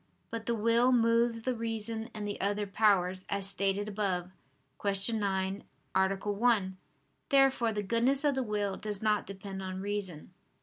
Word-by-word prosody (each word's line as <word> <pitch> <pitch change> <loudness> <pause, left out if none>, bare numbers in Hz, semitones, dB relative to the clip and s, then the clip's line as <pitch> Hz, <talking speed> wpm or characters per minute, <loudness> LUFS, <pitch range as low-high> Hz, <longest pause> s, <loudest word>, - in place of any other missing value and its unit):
But 225 -1 -5
the 235 - +1
will 230 +3 +3
moves 230 -1 +2
the 255 - 0
reason 225 0 -2
and 210 -1 -4
the 205 - -4
other 205 +1 0
powers, 190 -3 +2
as 200 -1 0
stated 195 +1 +1
above 190 -4 -2 0.5
(Q. 200 +2 +3
9, 195 -1 -1 0.3
A. 190 +1 +2
1). 205 -1 +1 0.5
Therefore 270 -4 +4
the 210 -1 -2
goodness 240 +7 +2
of 290 -1 +3
the 265 - -1
will 205 -4 -2
does 210 -1 -5
not 210 -1 +1
depend 195 0 -7
on 185 0 -5
reason. 190 -5 -4
205 Hz, 160 wpm, -30 LUFS, 195-230 Hz, 0.5 s, Therefore